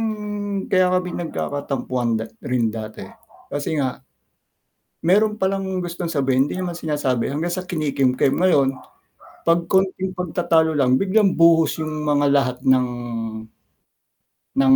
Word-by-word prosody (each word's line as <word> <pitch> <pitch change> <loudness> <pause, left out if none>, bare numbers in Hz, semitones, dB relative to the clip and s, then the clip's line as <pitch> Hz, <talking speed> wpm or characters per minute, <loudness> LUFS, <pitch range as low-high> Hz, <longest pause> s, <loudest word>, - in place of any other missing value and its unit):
yung 225 -1 0 0.6
kaya 185 -1 +4
kami 180 -1 -2
nagkakatampuan 135 -7 -2
dat 110 0 -7
rin 120 -3 0
dati, 110 -1 -7 0.5
kasi 145 +2 -2
nga 130 -3 -2 1.1
meron 210 +3 +3
palang 190 -1 -1
gustong 175 -1 -4
sabihin 135 -3 +2
hindi - - -4
naman 180 -2 -3
sinasabi, 145 -7 -1
hanggang 165 +5 -2
sa 185 - -3
kinikimkim, 140 -6 +1
ngayon, 145 -7 +3 0.7
pag 170 0 +3
konting 190 0 0
pagtatalo 170 -2 +1
lang 130 -4 +3
biglang 195 +1 +2
buhos 165 -2 +5
yung 155 0 -4
mga 145 -1 +2
lahat 135 -3 +2
ng 130 -1 +4 1.7
ng 135 -1 +6
160 Hz, 125 wpm, -21 LUFS, 135-180 Hz, 1.7 s, ng